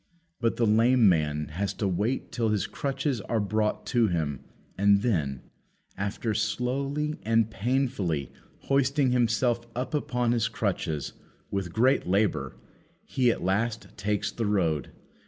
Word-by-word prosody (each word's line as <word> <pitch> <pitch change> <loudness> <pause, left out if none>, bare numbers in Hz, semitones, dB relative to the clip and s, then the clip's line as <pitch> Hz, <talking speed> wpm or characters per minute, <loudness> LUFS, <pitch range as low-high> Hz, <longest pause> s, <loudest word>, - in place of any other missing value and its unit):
But 115 -1 +1
the 120 - +2
lame 115 +2 +5
man 75 -4 +1
has 95 +5 -3
to 100 - -1
wait 105 +8 -1
till 115 -2 0
his 105 -2 +1
crutches 135 -3 -2
are 115 +3 -1
brought 105 +1 0
to 120 -3 +4
him; 80 -7 -1 0.4
and 100 +1 +4
then, 75 - 0 0.5
after 100 +3 -2
slowly 140 +7 -1
and 115 0 +2
painfully 110 - -1 0.3
hoisting 135 0 +2
himself 120 0 +1
up 125 +1 -3
upon 125 -5 0
his 115 -2 +2
crutches, 90 -9 -2 0.4
with 95 -3 -2
great 125 +7 +2
labour, 90 - +1 0.5
he 125 -2 +2
at 115 - -1
last 110 +5 -1
takes 105 0 -1
the 115 -3 -2
road. 80 -9 +1
110 Hz, 135 wpm, -27 LUFS, 95-125 Hz, 0.5 s, lame